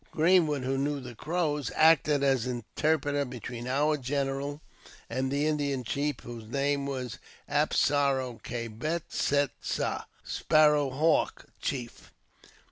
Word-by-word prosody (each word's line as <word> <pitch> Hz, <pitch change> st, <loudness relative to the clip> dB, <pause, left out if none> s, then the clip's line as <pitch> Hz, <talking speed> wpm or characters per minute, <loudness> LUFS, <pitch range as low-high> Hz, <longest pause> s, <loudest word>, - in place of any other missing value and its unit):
Greenwood, 160 Hz, -4 st, +3 dB
who 135 Hz, +1 st, 0 dB
knew 145 Hz, +1 st, 0 dB
the 125 Hz, -2 st, -8 dB
Crows, 150 Hz, -1 st, -1 dB
acted 150 Hz, -3 st, +5 dB
as 130 Hz, -3 st, +2 dB
interpreter 145 Hz, +4 st, 0 dB
between 125 Hz, -2 st, -6 dB
our 150 Hz, +4 st, +2 dB
general 140 Hz, +1 st, -2 dB, 0.5 s
and 130 Hz, 0 st, -1 dB
the 140 Hz, +2 st, +1 dB
Indian 145 Hz, -4 st, 0 dB
chief, 140 Hz, +5 st, -2 dB
whose 115 Hz, -2 st, -8 dB
name 140 Hz, +2 st, 0 dB
was 130 Hz, -4 st, -4 dB, 0.3 s
Ap -, -, +1 dB
sar 140 Hz, -2 st, +3 dB
o 125 Hz, -3 st, -5 dB
ka 115 Hz, -1 st, -4 dB
Bet 155 Hz, +10 st, -4 dB
set 145 Hz, -1 st, +2 dB
sa, -, -, -2 dB, 0.2 s
Sparrow 150 Hz, -2 st, +3 dB
Haivk 155 Hz, +5 st, +1 dB, 0.2 s
Chief. 125 Hz, -4 st, -5 dB
140 Hz, 130 wpm, -29 LUFS, 130-150 Hz, 0.5 s, acted